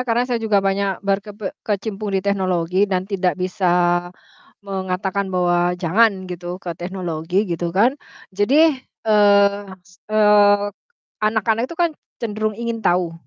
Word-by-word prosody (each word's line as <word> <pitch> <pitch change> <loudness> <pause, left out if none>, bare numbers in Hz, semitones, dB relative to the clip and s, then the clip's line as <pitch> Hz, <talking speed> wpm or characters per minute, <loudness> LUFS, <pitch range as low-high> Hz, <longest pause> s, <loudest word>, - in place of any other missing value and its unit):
karena 240 -1 +1
saya 245 -2 -2
juga 205 -3 +1
banyak 195 0 -1
berkepe 200 +1 -2
kecimpung 210 0 -3
di 190 - -2
teknologi, 185 -1 +1
dan 185 -1 -1
tidak 190 -2 -1
bisa 185 0 -1 1.0
mengatakan 190 0 -2
bahwa 175 -1 +1
jangan 190 +3 +2
gitu 180 0 -6
ke 180 -2 -6
teknologi, 175 +1 -2
gitu 175 -3 -3
kan. 205 +9 +3 0.4
Jadi, 270 +9 +3 0.2
eee, 205 -2 +4 0.2
s 180 -1 -23
eee, 205 -1 +4 0.5
anak-anak 220 +2 +1
itu 335 - -9
kan, 340 -1 +2 0.3
cenderung 215 -2 -3
ingin 235 -1 -3
tahu, 175 -4 +1
200 Hz, 130 wpm, -20 LUFS, 185-215 Hz, 1.0 s, eee